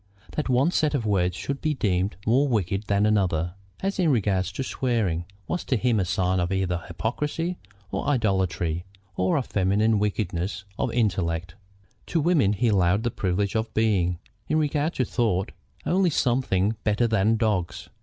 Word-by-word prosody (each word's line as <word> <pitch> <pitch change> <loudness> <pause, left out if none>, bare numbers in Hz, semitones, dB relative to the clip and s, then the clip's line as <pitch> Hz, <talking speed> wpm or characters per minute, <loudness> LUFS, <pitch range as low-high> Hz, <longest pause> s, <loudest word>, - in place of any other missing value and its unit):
That 150 - -3
one 130 +7 +3
set 155 -4 +1
of 120 -5 -1
words 90 -4 +1
should 135 +10 -4
be 155 -1 0
deemed 95 -4 0
more 130 +6 +3
wicked 100 -4 0
than 100 +1 +2
another, 90 -5 +1 0.3
as 195 +1 -2
in 175 -3 +3
regard 100 -7 +2
to 95 +9 -4
swearing, 110 -11 -1 0.2
was 180 - -2
to 130 - +1
him 120 -1 +2
a 95 - +1
sign 95 0 +1
either 90 +1 0
of 85 - -4
hypocrisy, 150 - -2 0.3
of - - -2
idolatry, 95 - 0 0.3
or 90 +1 +1
of 135 - -1
feminine 105 +3 +2
weakness 95 -2 -2 0.2
of - - 0
intellect. 90 -7 0 0.5
To 170 - 0
women 145 - +3
he 115 +3 +1
allowed 100 +1 +3
the 120 - 0
privilege 95 +1 -1
of 110 0 -1
being, 95 -6 +2 0.3
in 155 - +2
regard 150 +1 0
to 130 - +1
thought, 105 -6 0 0.3
only 185 0 +3
something 120 - +1
better 110 +3 +2
than 110 0 +2
dogs. 105 -6 -1
105 Hz, 165 wpm, -25 LUFS, 95-125 Hz, 0.5 s, one